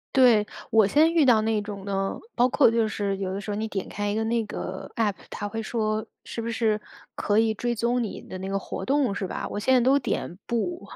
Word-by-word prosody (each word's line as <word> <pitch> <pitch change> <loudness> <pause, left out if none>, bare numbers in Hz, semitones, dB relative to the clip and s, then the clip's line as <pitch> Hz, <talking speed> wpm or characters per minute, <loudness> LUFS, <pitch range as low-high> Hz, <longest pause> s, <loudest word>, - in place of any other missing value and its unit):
对， 240 -5 +6 0.3
我 220 -2 +5
现 - - -8
在 320 - +6
遇 330 -2 +3
到 235 -5 +5
那 220 -1 +1
种 205 -1 -7
呢， 195 -1 -1 0.2
包 250 +1 +3
括 275 -2 +5
就 230 -1 +2
是 200 -2 -1
有 190 -1 -3
的 195 - -3
时 205 +1 -5
候 205 - -2
你 220 +1 -2
点 195 -3 -4
开 205 0 -3
一 205 - -1
个 220 - 0
那 230 0 +1
个 190 -2 -6
APP， 215 -3 +1 0.2
它 205 - -4
会 225 +2 -4
说 215 -1 -1 0.2
是 230 - -5
不 230 - -3
是 220 -2 +1 0.3
可 205 +1 0
以 225 0 +3
追 240 +3 -2
踪 240 +2 +1
你 215 - -5
的 185 - -8
那 190 +1 -5
个 195 - 0
活 - - -5
动， 270 -5 +2
是 195 -1 -3
吧？ - - -4
我 205 - -3
现 240 +5 +1
在 255 - +6
都 265 +4 +4
点 175 - -3
“不”， 340 +10 -1
220 Hz, 280 characters per minute, -26 LUFS, 205-240 Hz, 0.3 s, 对